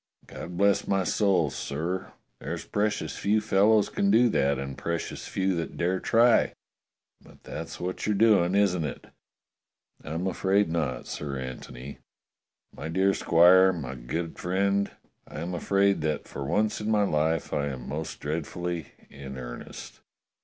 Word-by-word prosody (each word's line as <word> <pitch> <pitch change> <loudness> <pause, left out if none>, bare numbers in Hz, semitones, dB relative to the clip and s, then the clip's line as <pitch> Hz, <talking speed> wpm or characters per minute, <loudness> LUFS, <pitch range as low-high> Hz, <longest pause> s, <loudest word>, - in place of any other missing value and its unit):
God 85 0 -8
bless 100 +1 +3
my 95 -1 +2
soul, 90 -6 +2
sir, 85 +8 -4 0.3
there's - - -5
precious 105 +1 -1
few 105 +2 +2
fellows 105 0 +3
can 100 - 0
do 115 +4 +5
that, 70 -8 +2
and 70 0 -5
precious 85 0 -4
few 95 0 0
that 85 - -4
dare 90 +2 0
try; 115 +1 +4 0.7
but - - -19
that's - - -7
what 90 +3 -3
you're 105 - +2
doing, 100 -4 +4
isn't 95 -4 +2
it?" 75 - -5 1.0
"I'm 80 +4 -3
afraid 95 +1 +1
not. 80 -6 -2
Sir 70 -2 -5
Antony. 65 +1 -8 0.8
My 75 - -6
dear 95 +3 +2
squire, 90 +3 +6
my 70 -7 -5
good 75 +7 -5
friend, 100 +2 +1 0.4
I - - -8
am 85 +3 -4
afraid 100 +2 +2
that 75 -1 -2
for 70 - -6
once 105 +9 0
in 105 - -2
my 105 -1 +3
life 80 -3 0
I 70 0 0
am 65 -3 -6
most 75 +3 -5
dreadfully 80 +1 -4 0.2
in 65 -1 -8
earnest." - - -9
90 Hz, 150 wpm, -27 LUFS, 75-100 Hz, 1.0 s, squire